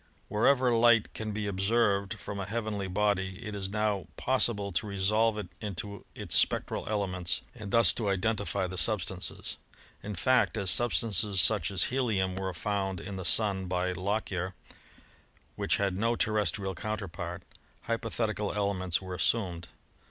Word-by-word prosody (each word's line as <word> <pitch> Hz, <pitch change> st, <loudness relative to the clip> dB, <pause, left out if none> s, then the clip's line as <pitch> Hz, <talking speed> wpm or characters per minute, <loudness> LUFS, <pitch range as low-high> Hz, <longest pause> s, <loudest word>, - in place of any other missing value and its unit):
Wherever 125 Hz, +4 st, +3 dB
light 115 Hz, -1 st, +4 dB
can 110 Hz, -1 st, -4 dB
be 105 Hz, 0 st, -3 dB
ob 95 Hz, -2 st, -3 dB
tained 100 Hz, -1 st, +2 dB
from 100 Hz, +1 st, -6 dB
a 100 Hz, -, -4 dB
heavenly 105 Hz, -3 st, -3 dB
body 95 Hz, -1 st, 0 dB
it 105 Hz, -, -5 dB
is 95 Hz, -2 st, -3 dB
now 105 Hz, -2 st, -1 dB
possible 115 Hz, -6 st, +2 dB
to 95 Hz, +4 st, -1 dB
resolve 105 Hz, +3 st, +2 dB
it 105 Hz, -4 st, -5 dB
into 100 Hz, -1 st, -5 dB
its -, -, -1 dB
spectral -, -, +2 dB
elements 90 Hz, -4 st, -1 dB
and 110 Hz, -5 st, -8 dB
thus 115 Hz, +3 st, +5 dB
to 110 Hz, -4 st, -1 dB
identify 100 Hz, 0 st, 0 dB
the 90 Hz, 0 st, -1 dB
sub 105 Hz, -5 st, +4 dB
stances. 95 Hz, -2 st, -5 dB, 0.4 s
In 105 Hz, 0 st, -5 dB
fact, 130 Hz, +4 st, +2 dB
as 100 Hz, -3 st, +2 dB
substances 105 Hz, -5 st, +2 dB
such 95 Hz, -5 st, +3 dB
as 95 Hz, -3 st, +1 dB
helium 105 Hz, -8 st, 0 dB
were 95 Hz, 0 st, -2 dB
found 95 Hz, +1 st, -2 dB
in 95 Hz, +4 st, -6 dB
the 95 Hz, -1 st, -5 dB
Sun 100 Hz, -4 st, +3 dB
by 90 Hz, 0 st, 0 dB
Lockyer, 95 Hz, -1 st, -2 dB, 1.0 s
which -, -, +1 dB
had 100 Hz, -2 st, 0 dB
no 115 Hz, +4 st, +1 dB
terrestrial 105 Hz, -3 st, 0 dB
counter 105 Hz, +3 st, -4 dB
part, 85 Hz, -, -6 dB, 0.4 s
hypothetical 110 Hz, -2 st, -2 dB
elements 95 Hz, -3 st, 0 dB
were 95 Hz, -1 st, -6 dB
assumed. 90 Hz, -3 st, 0 dB
100 Hz, 155 wpm, -29 LUFS, 95-110 Hz, 1.0 s, thus